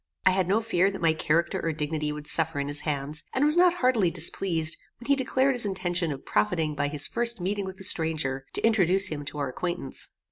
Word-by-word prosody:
I 185 Hz, -, +6 dB
had 185 Hz, -1 st, 0 dB
no 205 Hz, +4 st, +1 dB
fear 195 Hz, -4 st, +1 dB
that 195 Hz, -, -7 dB
my 160 Hz, -1 st, +3 dB
character 160 Hz, +1 st, 0 dB
or 165 Hz, -, -1 dB
dignity 150 Hz, 0 st, -3 dB
would 150 Hz, 0 st, -7 dB
suffer 160 Hz, -1 st, +1 dB
in 140 Hz, 0 st, -3 dB
his 145 Hz, 0 st, -3 dB
hands, 150 Hz, 0 st, -4 dB
and 265 Hz, +2 st, +2 dB
was 300 Hz, +1 st, +8 dB
not 355 Hz, 0 st, +4 dB
heartily 250 Hz, -, +2 dB
displeased 165 Hz, -1 st, +2 dB, 0.2 s
when 240 Hz, -, -12 dB
he 280 Hz, -, +3 dB
declared 265 Hz, 0 st, +1 dB
his 245 Hz, -, 0 dB
intention 180 Hz, -3 st, -1 dB
of 135 Hz, -1 st, -8 dB
profiting 150 Hz, +10 st, 0 dB
by 145 Hz, -1 st, -2 dB
his 145 Hz, 0 st, 0 dB
first 235 Hz, +7 st, +2 dB
meeting 195 Hz, +3 st, -2 dB
with 190 Hz, 0 st, -8 dB
the 190 Hz, -, -8 dB
stranger 155 Hz, -7 st, 0 dB
to -, -, -1 dB
introduce 195 Hz, -4 st, +2 dB
him 145 Hz, -2 st, -5 dB
to 150 Hz, -, -7 dB
our 140 Hz, -2 st, -2 dB
acquaintance. 175 Hz, 0 st, -5 dB
170 Hz, 225 wpm, -26 LUFS, 150-200 Hz, 0.2 s, was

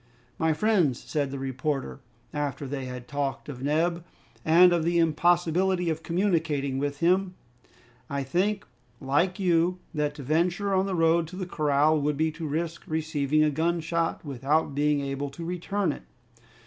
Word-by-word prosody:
"My 160 Hz, -2 st, +2 dB
friends," 175 Hz, -, +2 dB
said 145 Hz, -3 st, -2 dB
the 140 Hz, -, -5 dB
reporter, 135 Hz, -, -3 dB, 0.3 s
after 145 Hz, -1 st, -3 dB
they 135 Hz, -1 st, -4 dB
had 125 Hz, -1 st, -7 dB
talked 140 Hz, -1 st, -3 dB
of 130 Hz, -4 st, -7 dB
Neb 165 Hz, +4 st, 0 dB, 0.4 s
and 175 Hz, +3 st, +6 dB
of 170 Hz, -2 st, +1 dB
the 170 Hz, +1 st, +1 dB
impossibility 175 Hz, +2 st, +2 dB
of 160 Hz, 0 st, -4 dB
communicating 160 Hz, -6 st, 0 dB
with 145 Hz, +1 st, -3 dB
him, 185 Hz, +2 st, +2 dB, 0.7 s
"I 140 Hz, 0 st, -2 dB
think, 195 Hz, +9 st, 0 dB, 0.3 s
like 150 Hz, +7 st, +1 dB
you, 175 Hz, -1 st, +2 dB, 0.2 s
that 150 Hz, -2 st, -1 dB
to 145 Hz, -, -8 dB
venture 175 Hz, +7 st, +1 dB
on 190 Hz, +1 st, +2 dB
the 190 Hz, -, -1 dB
road 165 Hz, 0 st, +3 dB
to 180 Hz, -, -10 dB
the 185 Hz, 0 st, -4 dB
corral 150 Hz, -2 st, +2 dB
would 145 Hz, 0 st, 0 dB
be 160 Hz, +1 st, +1 dB
to 165 Hz, 0 st, -6 dB
risk 165 Hz, +3 st, -3 dB
receiving 155 Hz, -2 st, +1 dB
a 155 Hz, -, +3 dB
gunshot 165 Hz, +2 st, -1 dB
without 140 Hz, +3 st, 0 dB
being 145 Hz, 0 st, +1 dB
able 140 Hz, 0 st, -3 dB
to 155 Hz, +5 st, -8 dB
return 180 Hz, +2 st, -1 dB
it. -, -, -7 dB
160 Hz, 160 wpm, -27 LUFS, 145-175 Hz, 0.7 s, and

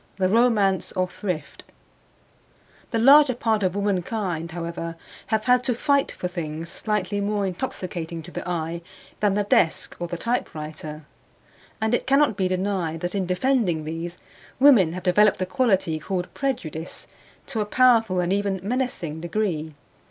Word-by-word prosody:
THE 190 Hz, -1 st, +1 dB
ROMANCE 210 Hz, -3 st, +2 dB
OF 185 Hz, -1 st, -1 dB
THRIFT 180 Hz, -8 st, -5 dB, 1.3 s
The -, -, -1 dB
larger 270 Hz, +2 st, +7 dB
part 225 Hz, -3 st, +1 dB
of 185 Hz, -1 st, 0 dB
womankind, 190 Hz, -4 st, -1 dB
however, 165 Hz, 0 st, -5 dB, 0.3 s
have 220 Hz, -1 st, 0 dB
had 250 Hz, 0 st, +4 dB
to 245 Hz, -, +1 dB
fight 280 Hz, +3 st, +2 dB
for 180 Hz, -, -4 dB
things 165 Hz, -2 st, -5 dB
slightly 205 Hz, -2 st, -1 dB
more 205 Hz, 0 st, 0 dB
intoxicating 175 Hz, -5 st, -4 dB
to 175 Hz, -, -10 dB
the -, -, -5 dB
eye 170 Hz, 0 st, -3 dB, 0.4 s
than 205 Hz, -2 st, +2 dB
the 205 Hz, -, +2 dB
desk 170 Hz, -5 st, +1 dB
or 175 Hz, -, -3 dB
the 175 Hz, -, -4 dB
typewriter; 155 Hz, -8 st, -4 dB, 0.7 s
and 220 Hz, +1 st, 0 dB
it -, -, 0 dB
cannot 275 Hz, -4 st, +4 dB
be 190 Hz, -2 st, +1 dB
denied 185 Hz, -3 st, -1 dB
that 175 Hz, 0 st, -2 dB
in 195 Hz, -3 st, -1 dB
defending 180 Hz, -, +1 dB
these, 165 Hz, +3 st, -5 dB, 0.4 s
women 240 Hz, -, +6 dB
have 185 Hz, 0 st, -6 dB
developed 205 Hz, +3 st, +4 dB
the 185 Hz, -, -1 dB
quality 190 Hz, -, +1 dB
called 180 Hz, +3 st, -4 dB
prejudice 170 Hz, -, -4 dB, 0.4 s
to 230 Hz, -6 st, -2 dB
a -, -, 0 dB
powerful 225 Hz, -6 st, +4 dB
and 180 Hz, +1 st, +1 dB
even 200 Hz, -1 st, 0 dB
menacing 205 Hz, -, -2 dB
degree. 170 Hz, -4 st, -2 dB
190 Hz, 150 wpm, -24 LUFS, 170-220 Hz, 1.3 s, larger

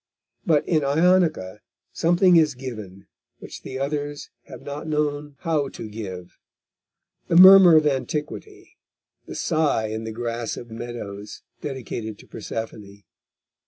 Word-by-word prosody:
But 150 Hz, -3 st, +2 dB
in 155 Hz, -4 st, +1 dB
Ionica 155 Hz, -, +2 dB, 0.3 s
something 175 Hz, +2 st, +3 dB
is 155 Hz, -4 st, +4 dB
given 110 Hz, -7 st, -8 dB, 0.3 s
which -, -, -10 dB
the 130 Hz, -, -7 dB
others 145 Hz, +1 st, -4 dB
have 130 Hz, -3 st, -12 dB
not 145 Hz, +2 st, -7 dB
known 150 Hz, -1 st, -2 dB
how 150 Hz, -4 st, 0 dB
to 115 Hz, -, -8 dB
give, 95 Hz, -5 st, -8 dB, 0.9 s
the -, -, 0 dB
murmur 185 Hz, -1 st, +9 dB
of 155 Hz, -, +3 dB
antiquity, 150 Hz, -, -4 dB, 0.5 s
the -, -, -8 dB
sigh 155 Hz, -9 st, 0 dB
in 110 Hz, +1 st, -4 dB
the 110 Hz, -, -5 dB
grass 115 Hz, 0 st, -4 dB
of 120 Hz, -1 st, -10 dB
meadows 110 Hz, -3 st, -8 dB, 0.2 s
dedicated 115 Hz, -6 st, -6 dB
to -, -, -16 dB
Persephone. 105 Hz, -3 st, -7 dB
140 Hz, 125 wpm, -23 LUFS, 110-155 Hz, 0.9 s, murmur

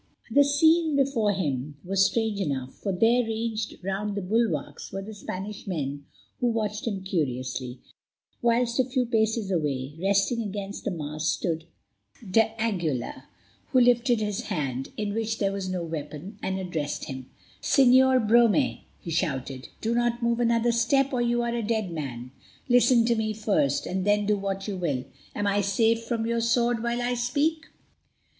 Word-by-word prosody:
The 285 Hz, +5 st, +6 dB
scene 315 Hz, +2 st, +3 dB
before 265 Hz, -7 st, +2 dB
him 145 Hz, -7 st, -2 dB
was 195 Hz, +1 st, +3 dB
strange 220 Hz, -3 st, -1 dB
enough, 135 Hz, -6 st, -2 dB
for 200 Hz, -, -4 dB
there, 225 Hz, +6 st, +4 dB
ranged 225 Hz, -1 st, -3 dB
round 200 Hz, +2 st, -2 dB
the 200 Hz, -, -3 dB
bulwarks, 195 Hz, -6 st, -1 dB
were 195 Hz, -, -4 dB
the 220 Hz, +2 st, -8 dB
Spanish 200 Hz, +1 st, -6 dB
men, 140 Hz, -5 st, -3 dB, 0.3 s
who 245 Hz, -, +1 dB
watched 215 Hz, -2 st, -1 dB
him 195 Hz, -4 st, -2 dB
curiously, 130 Hz, -7 st, -2 dB, 0.6 s
whilst 240 Hz, +1 st, +2 dB
a -, -, +6 dB
few 255 Hz, 0 st, 0 dB
paces 220 Hz, -3 st, 0 dB
away, 145 Hz, -5 st, -1 dB
resting 200 Hz, +4 st, +2 dB
against 200 Hz, -1 st, -5 dB
the -, -, +1 dB
mast, 155 Hz, -3 st, -2 dB
stood 165 Hz, 0 st, -2 dB, 0.6 s
d'Aguilar, 205 Hz, -, 0 dB, 0.4 s
who 260 Hz, -, +3 dB
lifted 240 Hz, -1 st, +4 dB
his 210 Hz, -2 st, -2 dB
hand, 135 Hz, -3 st, -3 dB
in 210 Hz, -1 st, -2 dB
which 225 Hz, 0 st, -1 dB
there 200 Hz, -2 st, +1 dB
was 195 Hz, -1 st, -4 dB
no 180 Hz, -2 st, -2 dB
weapon, 160 Hz, +3 st, -6 dB
and 190 Hz, 0 st, -2 dB
addressed 165 Hz, -6 st, -3 dB
him. 130 Hz, -1 st, -7 dB, 0.3 s
"Señor 260 Hz, -3 st, +5 dB
Brome," 235 Hz, +4 st, +4 dB, 0.2 s
he 170 Hz, -, -7 dB
shouted, 135 Hz, -6 st, -2 dB
"do 225 Hz, +1 st, 0 dB
not 240 Hz, 0 st, 0 dB
move 235 Hz, 0 st, +1 dB
another 235 Hz, 0 st, +3 dB
step 270 Hz, +4 st, +2 dB
or 250 Hz, -, +1 dB
you 240 Hz, 0 st, +1 dB
are 235 Hz, 0 st, -1 dB
a 235 Hz, -, -1 dB
dead 215 Hz, -4 st, -1 dB
man. 130 Hz, -6 st, -5 dB, 0.4 s
Listen 245 Hz, -1 st, +5 dB
to 235 Hz, -, +3 dB
me 220 Hz, -1 st, -1 dB
first, 205 Hz, -10 st, +1 dB
and 185 Hz, +1 st, -2 dB
then 205 Hz, +1 st, +2 dB
do 210 Hz, +1 st, +3 dB
what 195 Hz, 0 st, -3 dB
you 205 Hz, -, -2 dB
will. 145 Hz, -8 st, -1 dB, 0.3 s
Am 205 Hz, -, -1 dB
I 200 Hz, 0 st, +2 dB
safe 225 Hz, +3 st, +2 dB
from 230 Hz, -1 st, -2 dB
your 230 Hz, 0 st, 0 dB
sword 235 Hz, 0 st, +2 dB
while 235 Hz, +1 st, -1 dB
I 245 Hz, +1 st, 0 dB
speak?" 285 Hz, +7 st, 0 dB
210 Hz, 165 wpm, -26 LUFS, 175-235 Hz, 0.6 s, The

